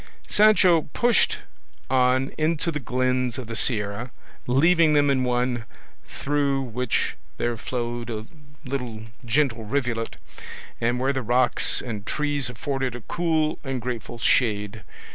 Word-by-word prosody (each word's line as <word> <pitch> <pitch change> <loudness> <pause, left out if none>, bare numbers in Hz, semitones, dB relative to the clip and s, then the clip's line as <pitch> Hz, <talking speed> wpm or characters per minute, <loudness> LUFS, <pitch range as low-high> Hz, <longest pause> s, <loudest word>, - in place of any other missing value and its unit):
Sancho 190 -7 +4
pushed 240 -1 +3 0.5
on 130 +1 +2
into 160 +2 0
the 150 - -3
glens 125 -1 0
of 130 - -5
the 115 0 -6
Sierra, 110 +1 -1 0.4
leaving 160 +5 +4
them 145 -1 +4
in 130 -2 +1
one 125 -1 0 0.4
through 140 -1 0
which 125 -1 -1 0.2
there 120 0 -1
flowed 120 0 -4
a 110 -1 -4 0.4
little 125 -5 -4 0.2
gentle 120 -2 +1
rivulet, 115 -1 -2 0.6
and 120 +2 +1
where 135 +2 +1
the 130 - -1
rocks 125 +2 +2
and 110 -5 -5
trees 145 +2 0
afforded 130 +1 -3
a 120 - -7
cool 160 +3 0
and 135 -2 -3
grateful 120 -1 -5
shade. 105 -4 +1
125 Hz, 130 wpm, -24 LUFS, 120-145 Hz, 0.6 s, Sancho